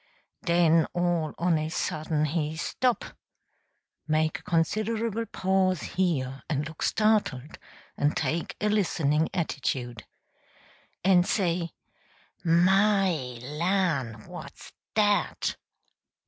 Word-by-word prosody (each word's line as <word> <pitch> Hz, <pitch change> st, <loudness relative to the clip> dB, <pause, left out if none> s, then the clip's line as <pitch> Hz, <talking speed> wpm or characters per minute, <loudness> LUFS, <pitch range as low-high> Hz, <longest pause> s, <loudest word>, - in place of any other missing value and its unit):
Den 170 Hz, -2 st, +4 dB
all 175 Hz, -3 st, 0 dB
on 170 Hz, -2 st, +2 dB
a 155 Hz, 0 st, -2 dB
sudden 155 Hz, -2 st, -1 dB
he 155 Hz, 0 st, -2 dB
stop 245 Hz, +8 st, 0 dB, 1.0 s
(make 155 Hz, 0 st, +1 dB
a -, -, -18 dB
considerable 215 Hz, +6 st, 0 dB
pause 185 Hz, -2 st, +1 dB
here, 135 Hz, -8 st, 0 dB
and 150 Hz, -1 st, -1 dB
look 160 Hz, -, -11 dB
startled, 210 Hz, -, +1 dB, 0.4 s
and 145 Hz, +1 st, +1 dB
take 165 Hz, +1 st, -2 dB
a 210 Hz, -, 0 dB
listening 160 Hz, -7 st, +1 dB
attitude) 125 Hz, -, -3 dB, 1.0 s
en 185 Hz, -2 st, +6 dB
say: 175 Hz, -3 st, 0 dB, 0.7 s
"My 190 Hz, +3 st, +4 dB, 0.3 s
LAN', 150 Hz, -, -1 dB
what's -, -, -10 dB, 0.2 s
dat!" 205 Hz, -1 st, +1 dB
170 Hz, 95 wpm, -27 LUFS, 155-190 Hz, 1.0 s, en